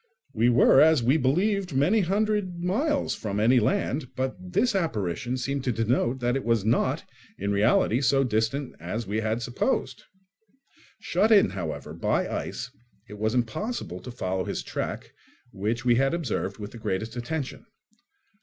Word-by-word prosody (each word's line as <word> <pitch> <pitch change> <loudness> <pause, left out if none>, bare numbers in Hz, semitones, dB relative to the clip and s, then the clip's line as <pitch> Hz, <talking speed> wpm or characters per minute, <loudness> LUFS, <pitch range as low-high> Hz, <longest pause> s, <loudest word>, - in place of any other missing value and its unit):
We 115 +1 +3
were, 125 +2 +6
as 155 -4 +5
we 130 +6 +4
believed, 180 +5 +1
many 175 +12 +3
hundred 200 -1 0
miles 275 - 0
from 105 -1 -3
any 120 +4 +5
land; 125 +4 0
but 130 0 -2 0.2
this 220 +5 +2
apparition 120 - -1
seemed 140 +1 -2
to 125 - +2
denote 120 +3 0
that 120 +1 +1
it 135 - -2
was 115 -3 +1
not, 115 - +1 0.3
in 100 +1 -2
reality, 110 +4 +3
so 135 0 +3
distant 120 +3 -1
as 100 +8 -4
we 105 +3 -2
had 110 +2 -1
supposed. 125 - -2 0.9
Shut 220 - +1
in, 205 -3 +6
however, 80 -5 -5
by 85 - 0
ice, - - -4 0.4
it 105 -1 -10
was 110 +2 0
impossible 120 - -2
to 110 - -10
follow 95 -6 -2
his - - -4
track, - - -5 0.4
which 110 +5 -2
we 120 - +5
had 135 +5 +2
observed 120 - -3
with 105 -1 -7
the 120 - -10
greatest 110 +2 -3
attention. 140 - -4
125 Hz, 160 wpm, -26 LUFS, 110-160 Hz, 0.9 s, were